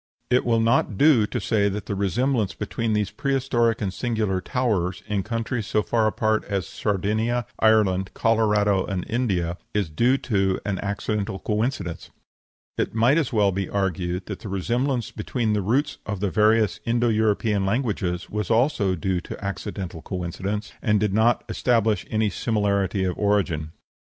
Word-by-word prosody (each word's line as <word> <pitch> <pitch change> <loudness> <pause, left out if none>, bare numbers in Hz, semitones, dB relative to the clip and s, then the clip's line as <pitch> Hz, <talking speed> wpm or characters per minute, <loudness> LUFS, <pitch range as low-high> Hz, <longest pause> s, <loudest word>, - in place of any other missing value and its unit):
It 125 - +3
will 115 -1 +3
not 115 -3 +2
do 135 -7 +5
to - - -3
say 100 -3 +1
that 100 0 -4
the - - -3
resemblance 105 +2 0
between 115 -2 -2
these 105 -1 0
prehistoric 120 -2 0
and 95 -2 -2
singular 105 -3 -1
towers, 95 -7 -1
in 105 -2 -1
countries 115 +1 -3
so 105 - +1
far 115 -2 +1
apart 110 0 +1
as 100 -4 -2
Sardinia, 110 +6 -1
Ireland, 100 -4 +3
Colorado, 105 -4 +2
and 95 -3 -3
India, 95 -8 -1 0.2
is 100 -7 0
due 120 - +3
to 95 -7 0
an 100 -3 -1
accidental 100 0 -2
coincidence. 105 -4 -2 0.7
It - - -1
might 120 +8 +4
as 150 - -1
well 105 -3 +3
be 95 0 -3
argued 90 -2 -1
that - - -6
the 105 - -8
resemblance 120 +6 -1
between 110 +1 -1
the 105 - +1
roots 125 +10 0
of 100 -2 -3
the 100 -1 -1
various 110 0 +3
Indo 120 0 +1
European 105 -2 +1
languages 100 -6 -1
was 105 -2 -3
also 115 -6 +2
due 90 +1 -1
to 100 - -8
accidental 95 -4 -5
coincidence, 95 +4 -4
and 105 -1 +2
did 105 -2 0
not 110 +3 +3
establish 110 -5 +1
any 110 -1 +1
similarity 100 -3 0
of 90 -1 -1
origin. 95 -7 0
105 Hz, 160 wpm, -24 LUFS, 95-115 Hz, 0.7 s, do